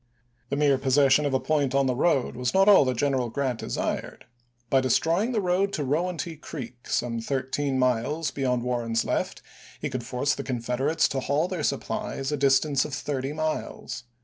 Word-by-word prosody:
The 140 - -1
mere 140 -2 +3
possession 135 +2 +4
of 140 - -2
a - - +3
point 140 -3 0
on 140 0 +3
the 130 - +1
road 135 0 +1
was 125 +4 -2
not 195 +1 +5
all 200 -8 +7
that 130 -2 -1
General 130 -3 +1
Grant 130 -2 -2
desired. - - -3 0.4
By 135 +2 +3
destroying 165 - +2
the 220 -4 0
road 185 +2 +1
to 150 - -1
Rowanty 165 +3 -2
Creek, 125 -5 -8
some 115 -1 -1
thirteen 135 +2 -1
miles 130 +5 0
beyond 125 -3 -1
Warren's 120 -2 -1
left, - - -2 0.4
he - - -3
could 130 -1 -3
force 130 +4 0
the 140 - -5
Confeder 125 +2 -1
ates 165 - +3
to 135 - -1
haul 145 +5 0
their 185 -3 -4
supplies 140 -1 -2
a - - +1
distance 135 0 +3
of 145 - -4
thirty 135 0 -3
miles. 155 -4 -4
135 Hz, 185 wpm, -26 LUFS, 125-150 Hz, 0.4 s, all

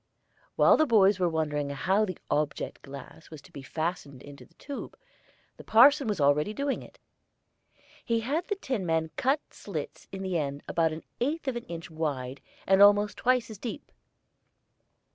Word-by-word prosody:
While - - +6
the 310 - +3
boys 200 -4 +5
were 180 -1 +2
wondering 150 -3 -1
how 190 +10 +1
the 185 -4 -6
object 150 0 -1
glass 140 +3 -11
was 155 - -10
to 190 - -17
be 140 - -9
fastened 145 -2 -4
into 145 -1 -12
the - - -31
tube, 280 -1 -8 0.6
the - - -11
parson 275 +4 +6
was 210 -5 -1
already 150 +8 +2
doing 280 0 -1
it. - - -14 1.1
He 230 -1 0
had 295 +9 -2
the 410 - -1
tinman 175 - -1
cut 270 +3 +1
slits - - -7
in 195 0 -6
the 185 -3 -1
end 140 -1 -4
about 165 -1 +1
an 155 +1 -7 0.2
eighth 295 +4 -1
of 265 - 0
an 240 - -5
inch 165 0 -8
wide 140 -5 -3 0.2
and 195 +1 +4
almost 205 +1 +6
twice 250 -2 +1
as 210 - -10
deep. 235 - -7
185 Hz, 170 wpm, -28 LUFS, 150-235 Hz, 1.1 s, While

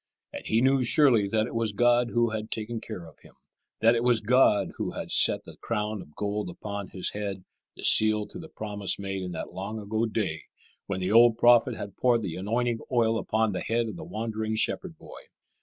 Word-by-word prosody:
And - - -7
he 110 +1 +2
knew 135 0 +3
surely 120 -5 +4
that 110 +2 0
it - - -8
was 115 -2 -1
God 120 +2 +3
who 120 -1 +1
had 110 0 -5
taken 110 +1 -4
care 95 -6 -7
of 80 - -16
him; - - -19 0.5
that 115 +1 +5
it 115 0 0
was 120 -2 +3
God 110 -1 +3
who - - -3
had - - -6
set - - +4
the - - -13
crown 105 -2 -3
of 75 - -16
gold 105 -2 -3
upon 100 +2 -6
his 95 - -3
head, 100 -2 -5 0.3
the - - -10
seal 110 -1 +5
to 175 - -9
the 160 -2 -10
promise 105 -5 -3
made 95 -1 -4
in 90 -1 -5
that 80 - -6
long 100 +4 -5
ago 110 +2 -2
day 100 -8 -3 0.4
when 95 -1 -3
the 90 +2 -1
old 115 0 +6
prophet 120 0 +4
had 100 -2 -8
poured 120 -3 +2
the 90 -5 -4
anointing 115 +4 -1
oil 115 -2 +2
upon 110 0 0
the 90 - -4
head 115 0 -1
of 105 - -7
the - - -8
wandering 110 0 -4
shepherd 110 - -2
boy. - - -11
110 Hz, 215 wpm, -27 LUFS, 100-115 Hz, 0.5 s, old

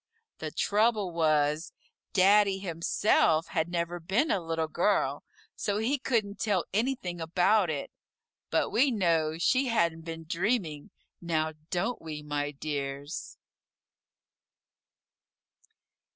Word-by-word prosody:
The - - -4
trouble 210 -2 +1
was, 155 0 +1 0.4
Daddy 200 +1 +5
himself 170 -2 +1
had 160 0 -1
never 175 0 -2
been 195 - +1
a 190 - +1
Little 165 -1 -1
Girl, 155 -5 +1 0.3
so 205 -1 -1
he 250 +6 0
couldn't 215 -6 -1
tell 195 -6 +1
anything 210 -6 -1
about 180 +4 +3
it, 145 -3 -3 0.6
but - - +1
we 270 +5 +4
know 165 -8 +1
she 255 +10 +2
hadn't 170 -8 +1
been 165 0 -7
dreaming, 170 -4 -1 0.3
now, 160 -2 -1 0.2
don't 195 +7 -1
we, 155 -2 -6
my 145 -1 -2
dears? 140 +1 -5
170 Hz, 110 wpm, -29 LUFS, 160-205 Hz, 0.6 s, Daddy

